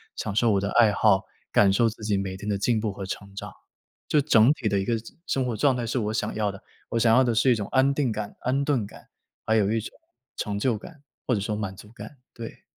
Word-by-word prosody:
享 105 - -4
受 115 0 +3
我 100 -1 +2
的 100 - -1
爱 115 -3 +6
好， 95 -1 +3 0.3
感 100 -1 +5
受 115 +2 +3
自 110 0 -11
己 105 -1 +1
每 95 -1 -3
天 105 - -8
的 100 - +1
进 110 +2 +1
步 105 -2 -2
和 95 -1 -6
成 100 0 -7
长。 - - -6 0.6
就 150 - +3
整 125 -3 +5
体 125 -7 -3
的 100 -1 +1
一 95 - -2
个 115 - +1 0.3
生 130 -1 0
活 120 -3 -2
状 135 +2 +3
态 120 - -2
是 120 +3 -2
我 105 0 -2
想 - - -2
要 105 -2 0
的， 95 +3 -13 0.3
我 115 - 0
想 115 0 +4
要 130 - +6
的 120 -2 +1
是 125 +3 +4
一 - - +4
种 105 -2 -4
安 135 +1 +3
定 135 -5 0
感、 105 -1 -5
安 135 +3 0
顿 130 -8 +1
感， - - -15 0.4
还 110 - +2
有 105 -1 +2
一 115 - +1
种 110 - -7 0.5
成 105 -2 -2
就 120 -2 +1
感， 155 +6 -13 0.3
或 125 - +2
者 - - -1
说 105 +1 -2
满 100 -3 -4
足 105 +3 -14
感， 135 +4 -11 0.2
对。 115 -1 -9
110 Hz, 280 characters per minute, -25 LUFS, 100-125 Hz, 0.6 s, 爱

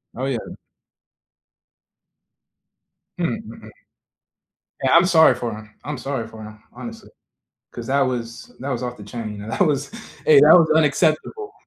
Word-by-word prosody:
Oh 130 - -3
yeah. 130 -5 -4 2.6
Hmm, - - -1
mhm. - - -11 1.2
Yeah, 130 - +3
I'm 170 +2 +6
sorry 160 -7 +6
for 120 -2 -4
him, 110 0 -12
I'm 150 -3 -5
sorry 130 -5 -4
for 110 -1 -11
him, 110 0 -12
honestly, 230 -1 -10 0.6
'cause - - -8
that 140 +1 +2
was 120 -3 -3
that 135 - -5
was 125 -2 -3
off 125 0 -5
the 105 - -11
chain, 105 -1 -7
and 110 +2 -7
that - - -3
was 145 -5 +1 0.4
hey, 465 -3 +7
that - - +8
was 170 -3 +6
unacceptable. 160 - +1
130 Hz, 150 wpm, -21 LUFS, 115-160 Hz, 2.6 s, that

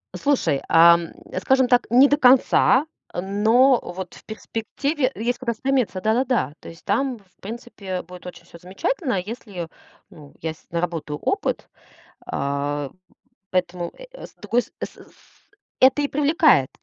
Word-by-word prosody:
Слушай, 175 - +1
ам, 170 0 +6 0.3
скажем 260 +5 +3
так, 245 0 +3
не 255 +4 +7
до 290 - +2
конца, 260 +1 +5 0.3
но 220 +8 +3
вот 180 0 -7
в - - -16
перспективе 255 +6 -2
есть 240 +3 -1
куда 240 -3 -2
стремиться, 240 -6 -1
да-да-да. 230 - +1
То - - -10
есть 165 +1 -14
там, 255 +4 0
в 185 -3 -30
принципе, 200 -4 -6
будет 180 0 -13
очень 180 - -10
всё - - -14
замечательно, 195 - -2
если, 200 -5 -7 0.4
ну, 145 -2 -15
я 160 0 -3
с - - -24
наработаю 170 -3 -3
опыт. 395 - -2 0.6
А, 140 0 -2 0.6
поэтому 180 -1 -1
э, - - -11
э, - - -9
с - - -23
другой 245 - 0
с - - -20
э, - - 0
с - - -15 0.8
это 265 +3 +5
и 285 - +1
привлекает 290 - +3
215 Hz, 150 wpm, -22 LUFS, 175-260 Hz, 0.8 s, не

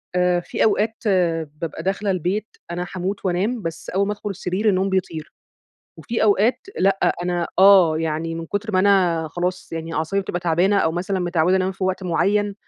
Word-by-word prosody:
آآ 180 -1 +2
في 175 - -2
أوقات 220 +1 +2 0.7
بابقى 165 -1 -5
داخلة 195 +2 -1
البيت 190 +4 -1 0.2
أنا 175 +1 -3
هاموت 190 +2 -3
وأنام 200 +7 0
بس 165 -2 -6
أول 195 +2 0
ما 210 - -1
أدخل 210 0 -6
السرير 195 +2 -1
النوم 190 0 +1
بيطير. 180 -5 -3 0.7
وفي 230 -1 -3
أوقات 215 +3 +3 0.2
لأ، 195 +1 +2
أنا 175 -1 -1
آه 190 -5 +6
يعني 160 +1 -2
من 165 0 -6
كتر 205 +4 -3
ما 185 - +2
أنا 185 -5 +3
خلاص 180 +2 -3
يعني 165 0 -5
أعصابي 160 +6 0
بتبقى 175 -2 -4
تعبانة 180 +4 +2
أو 160 -4 +1
مثلًا 185 +3 -2
متعودة 175 +1 +2
أنام 190 0 0
في 190 0 -4
وقت 185 +1 -1
معين، 200 +3 +1
185 Hz, 180 wpm, -21 LUFS, 170-200 Hz, 0.7 s, آه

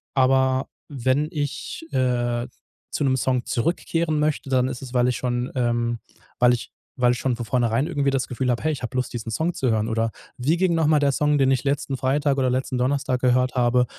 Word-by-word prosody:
Aber 130 0 +3 0.2
wenn 135 +2 +1
ich, 150 0 -4
äh, 120 -2 0 0.4
zu - - -1
'nem 130 -2 +2
Song 125 -1 0
zurückkehren 165 +3 0
möchte, 150 -2 -1
dann 130 -1 +2
ist 125 -2 -6
es, 130 -2 -8
weil 125 -1 +3
ich 125 - 0
schon, 125 0 -2
ähm 120 -1 0 0.4
weil 125 0 +5
ich 120 - -4 0.3
weil 125 -1 +4
ich 125 - -4
schon 130 -3 0
von 120 - -4
vornherein 120 +3 +1
irgendwie 140 -1 0
das 135 -2 0
Gefühl 125 +1 -2
habe: 120 - 0
„Hey, 155 - +2
ich 140 - -6
habe 120 - -5
Lust, 125 - -2
diesen 115 -2 -5
Song 160 +10 0
zu 130 - -1
hören.“ 110 0 +1
Oder: 115 0 0 0.3
„Wie 150 +7 +1
ging 180 -2 +2
noch 160 -2 +2
mal 155 -1 +4
der 140 -1 +3
Song, 150 +1 +2
den 135 -1 +3
ich 130 -2 +1
letzten 140 -1 -1
Freitag 140 +2 +1
oder 130 -1 +2
letzten 130 0 -1
Donnerstag 130 0 0
gehört 125 0 +2
habe?“ 125 0 +3
130 Hz, 220 wpm, -23 LUFS, 125-140 Hz, 0.4 s, weil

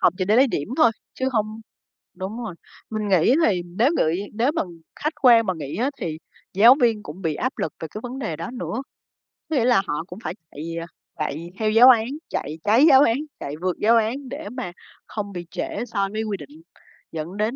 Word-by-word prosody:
học - - +5
chỉ 185 - +1
để 210 +4 +3
lấy 265 +3 +6
điểm 150 - -3
thôi, 240 -8 +6 0.2
chứ 260 0 -1
hông 215 0 -1 0.5
đúng 190 +5 -6
rồi. 195 -6 -6 0.3
Mình 215 -1 -2
nghĩ 190 - +4
thì 185 -4 +2
nếu 215 +10 +2
ngửi 160 +3 +2 0.2
nếu 235 +7 +2
mà 320 - 0 0.4
khách 305 +1 0
quan 235 -4 +7
mà 185 - 0
nghĩ 145 -2 -5
á 255 +5 +1
thì 155 -2 -3 0.4
giáo 230 +7 +8
viên 225 -3 +2
cũng 165 +6 -9
bị 160 -4 -1
áp 255 +2 -2
lực 155 - -2
về 160 - -5
cái 215 - -6
vấn 250 +2 -6
đề 215 - -3
đó 170 +8 -6
nữa. 255 -1 -4 0.7
Có 315 - -1
nghĩa 245 -4 +3
là 240 -6 +5
họ 150 +2 -2
cũng 180 +2 -9
phải 160 - -3 0.2
chạy, 150 - -8 0.2
à, 165 - -5 0.3
chạy 160 +3 -3
theo 215 -1 +1
giáo 240 +4 +8
án, 230 -2 +5 0.2
chạy 155 +3 -3
cháy 230 +8 +5
giáo 270 -1 +8
án, 230 -4 +4 0.2
chạy 140 - -5
vượt 180 -1 -1
giáo 230 +3 +4
án 245 +4 -1
để 295 +4 -6
mà 250 -8 -5 0.3
không 205 -2 -5
bị 175 -1 -6
trễ - - -3
so 200 -2 0
với 220 +1 -2
quy 205 -3 -2
định, 150 +2 -13 0.5
dẫn 165 +5 -5
đến 215 +4 0
215 Hz, 225 wpm, -23 LUFS, 175-245 Hz, 0.7 s, giáo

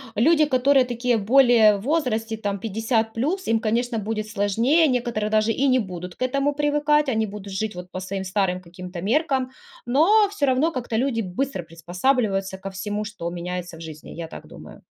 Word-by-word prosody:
Люди, 305 +8 +4
которые, 265 -1 +3
такие, 245 0 0
более 225 -1 +5
в - - -8
возрасте, 225 -5 -1
там, 200 -2 -3
50 225 +1 -1
плюс, 330 +11 -1
им, 225 0 +2
конечно, 235 +1 -1
будет 215 +1 -3
сложнее, 230 - +2
некоторые 240 -4 -1
даже 215 +1 +2
и 275 +5 +1
не 255 -1 +4
будут 180 -4 -6
к - - -29
этому 275 +3 0
привыкать, 295 0 +2
они 220 -2 +1
будут 200 -1 -8
жить, 210 +1 -3
вот, 180 0 -9
по 185 - -5
своим 190 +1 -4
старым, 185 -1 -1
каким-то, 180 0 -9
меркам. 260 - 0 0.3
Но, 350 - +4
всё 290 -9 0
равно, 270 +6 +2
как-то 240 -4 -4
люди 245 -2 0
быстро 195 +3 -3
приспосабливаются 190 +4 -1
ко 195 0 -7
всему, 205 +2 -4
что 210 -5 -5
меняется 175 0 -5
в - - -12
жизни, 155 -2 -9
я 165 -1 -6
так - - -11
думаю. - - -13
220 Hz, 185 wpm, -23 LUFS, 195-265 Hz, 0.3 s, более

